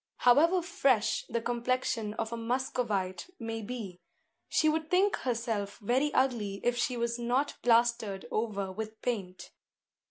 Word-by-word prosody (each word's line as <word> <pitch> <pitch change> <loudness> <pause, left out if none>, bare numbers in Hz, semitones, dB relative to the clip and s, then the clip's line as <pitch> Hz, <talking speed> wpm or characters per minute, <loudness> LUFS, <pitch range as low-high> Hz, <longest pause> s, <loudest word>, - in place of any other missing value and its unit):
However 330 +9 +5
fresh 250 -10 +1
the 235 0 -1
complexion 240 -3 -1
of 225 +1 -3
a - - -1
Muscovite 230 - -2
may 225 -1 -4
be, 210 -5 -6 0.5
she 310 - +3
would 315 0 +1
think 385 +3 +3
herself 225 -5 -2
very 255 +7 +1
ugly 220 -7 +1
if 245 0 +2
she 245 0 0
was 235 0 -1
not 250 +5 0
plastered 230 -4 +2
over 200 -3 -1
with 220 +2 -6
paint. 195 -7 -3
235 Hz, 135 wpm, -30 LUFS, 215-255 Hz, 0.5 s, However